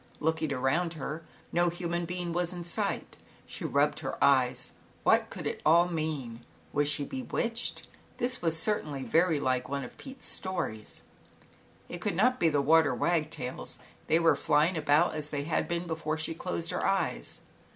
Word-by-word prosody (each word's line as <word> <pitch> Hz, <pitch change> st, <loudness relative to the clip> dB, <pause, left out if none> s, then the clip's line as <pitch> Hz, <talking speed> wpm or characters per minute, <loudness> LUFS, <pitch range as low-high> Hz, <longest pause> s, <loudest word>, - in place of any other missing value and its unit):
Looking 160 Hz, -1 st, 0 dB
around 140 Hz, +6 st, +1 dB
her, 155 Hz, +1 st, -5 dB, 0.3 s
no 175 Hz, +1 st, +3 dB
human 175 Hz, 0 st, -2 dB
being 175 Hz, 0 st, -3 dB
was 175 Hz, 0 st, 0 dB
in 175 Hz, -1 st, -6 dB
sight. 170 Hz, -, -2 dB, 0.3 s
She -, -, -6 dB
rubbed -, -, +2 dB
her -, -, -4 dB
eyes. 130 Hz, -3 st, +3 dB, 0.3 s
What -, -, +4 dB
could -, -, -7 dB
it -, -, -3 dB
all 170 Hz, +3 st, +6 dB
mean? 150 Hz, -8 st, -3 dB, 0.3 s
Was 145 Hz, 0 st, +2 dB
she 145 Hz, -, +1 dB
bewitched? 240 Hz, -, -2 dB, 0.3 s
This 250 Hz, +1 st, 0 dB
was 165 Hz, -1 st, +2 dB
certainly 155 Hz, -7 st, -1 dB
very 165 Hz, +7 st, +3 dB
much -, -, -4 dB
like 130 Hz, -1 st, 0 dB
one 140 Hz, 0 st, -2 dB
of 125 Hz, -, -10 dB
Pete's 270 Hz, -1 st, -7 dB
stories. 175 Hz, -, -4 dB, 0.8 s
It 175 Hz, -, -7 dB
could 205 Hz, -2 st, -1 dB
not 250 Hz, +7 st, +3 dB
be 165 Hz, -, +4 dB
the 145 Hz, -2 st, +1 dB
water 160 Hz, 0 st, +5 dB
wagtails; 155 Hz, -6 st, -1 dB, 0.3 s
they 160 Hz, -, +4 dB
were 165 Hz, -1 st, +4 dB
flying 155 Hz, +5 st, +2 dB
about 150 Hz, +2 st, +3 dB
as 150 Hz, -1 st, -3 dB
they 145 Hz, -1 st, -2 dB
had 155 Hz, +2 st, 0 dB
been 170 Hz, 0 st, -2 dB
before 160 Hz, -2 st, -2 dB
she 160 Hz, +1 st, -2 dB
closed 85 Hz, -, -3 dB
her -, -, -2 dB
eyes. -, -, 0 dB
160 Hz, 170 wpm, -30 LUFS, 145-175 Hz, 0.8 s, all